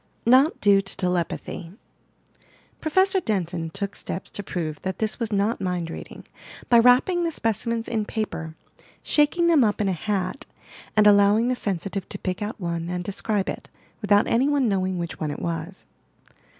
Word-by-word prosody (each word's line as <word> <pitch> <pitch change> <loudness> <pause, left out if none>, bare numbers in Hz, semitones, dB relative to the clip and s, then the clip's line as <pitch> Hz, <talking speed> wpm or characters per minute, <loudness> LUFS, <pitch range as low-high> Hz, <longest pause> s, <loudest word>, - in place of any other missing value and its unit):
NOT 260 +6 +5
DUE 200 -1 +5
TO 195 0 -8
TELEPATHY 180 -1 -3 1.1
Prof. 375 +5 +2
Denton 175 -5 -2
took 200 +5 -4
steps 185 - -6
to - - -5
prove 160 -6 -4
that 190 -1 -4
this 220 +2 -1
was 230 -2 -1
not 205 +2 0
mind 180 -3 -2
reading, - - -9 0.5
by 235 - +7
wrapping 255 +9 +4
the 335 - +1
specimens 230 -3 -1
in 220 -2 -1
paper, 170 -8 -4 0.5
shaking 300 +3 +2
them 330 -4 +5
np 210 -4 +2
in 205 -2 +1
a - - +1
hat, 190 - -3 0.5
and 210 - +6
allowing 205 +3 +5
the 255 - +1
sensitive 195 -2 -3
to - - -4
pick 185 +2 -4
out 210 +2 -4
one 170 -2 -3
and 180 0 -3
describe 200 +1 -1
it, - - -6 0.3
without 205 0 +4
any 255 +5 +2
one 285 -4 +2
knowing 190 -2 0
which 170 -1 -5
one 155 - -2
it 145 - -4
was. 170 +3 -5
205 Hz, 170 wpm, -24 LUFS, 180-230 Hz, 1.1 s, by